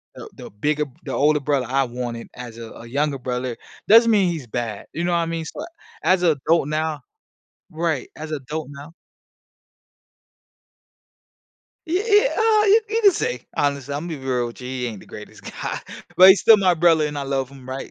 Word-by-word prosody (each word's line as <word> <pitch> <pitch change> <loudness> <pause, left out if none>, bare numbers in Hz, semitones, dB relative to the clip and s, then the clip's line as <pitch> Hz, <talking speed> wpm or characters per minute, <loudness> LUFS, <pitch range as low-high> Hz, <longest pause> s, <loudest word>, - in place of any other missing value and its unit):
the - - -10
the - - -10
bigger 150 +9 -1 0.2
the - - -5
older 150 +1 +3
brother 140 -2 0
I 135 +1 +2
wanted 120 -1 -6
as 120 -2 -9
a 115 -1 -8
a 115 - -11
younger 140 +3 -1
brother, 125 -1 -4 0.3
doesn't 230 +2 +7
mean 195 -4 +3
he's 155 -8 -5
bad. 115 -3 -5
You 170 +2 -2
know 175 - 0
what - - +3
I 165 - 0
mean? 165 -1 -4
So 300 - -7 0.4
as 185 -1 +3
a 165 - +5
adult 150 +1 +1
now 155 0 -2 0.7
Right, 160 -4 -2
as 155 0 -7
a - - 0
adult 150 +3 -6
now 145 +3 -11 3.0
Y 325 - -2
y 420 +3 +3
ah, 435 -1 +3
you 430 +3 +6
you 455 +1 +1
can 400 - +8
say. 125 - -3
Honestly, 140 -1 -1
Imma 160 +4 -4
be 160 - -4
real 130 -2 -2
with 120 - -12
you, 125 - -7
he 125 -1 -3
ain't 110 -4 -6
the - - -16
greatest - - -12
guy. - - -5 0.4
But 185 +1 +9
he's 190 - +7
still 220 -2 +7
my 185 -3 +3
brother, 160 -2 +3
and 145 -1 -5
I - - -3
love 135 -1 -2
him, 135 -2 -14
right? 135 +1 -6
150 Hz, 200 wpm, -22 LUFS, 130-170 Hz, 3.0 s, But